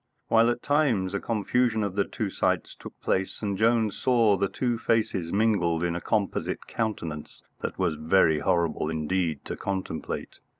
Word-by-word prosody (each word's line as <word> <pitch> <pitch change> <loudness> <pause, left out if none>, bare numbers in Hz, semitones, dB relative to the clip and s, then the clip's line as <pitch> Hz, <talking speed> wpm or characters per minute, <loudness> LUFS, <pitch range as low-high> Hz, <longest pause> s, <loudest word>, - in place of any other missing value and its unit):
While 115 +1 +5
at 120 0 -2
times 130 -11 +2
a 100 - 0
confusion 115 +1 +1
of 100 -2 -2
the 100 0 +1
two 105 -4 -3
sights - - 0
took - - -12
place, 95 +3 -1
and 100 -2 -1
Jones 110 0 +2
saw 115 -5 +4
the 100 +1 0
two 120 -3 -1
faces 95 -8 0
mingled 95 -6 +2
in 85 -1 0
a 85 - -3
composite 105 +1 -1
countenance 85 -9 -4 0.2
that - - -4
was 90 -4 +1
very 80 0 +3
horrible 85 -2 0
indeed 80 -1 -1
to - - -4
contemplate. 95 -4 -4
100 Hz, 165 wpm, -27 LUFS, 85-115 Hz, 0.2 s, While